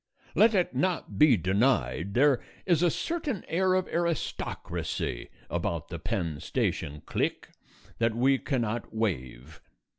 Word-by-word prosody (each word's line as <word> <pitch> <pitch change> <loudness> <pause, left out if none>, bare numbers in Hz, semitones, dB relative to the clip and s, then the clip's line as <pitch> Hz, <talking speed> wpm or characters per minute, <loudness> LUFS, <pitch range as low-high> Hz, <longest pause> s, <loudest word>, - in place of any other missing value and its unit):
Let 220 0 +5
it 180 -7 +2
not 175 +6 -1
be 150 -6 +7
denied, 95 - +1
there 135 0 +4 0.2
is 170 -4 +3
a 175 - +5
certain 300 - -2
air 185 +2 +2
of 185 -1 +1
aristocracy 170 - -2 0.2
about - - -2
the - - -5
Penn 80 -6 -2
Station 75 +1 -2
clique - - -2 0.5
that 115 -1 +2
we 130 +3 +3
cannot 120 -5 -2
waive. 70 - -3
125 Hz, 125 wpm, -28 LUFS, -, 0.5 s, be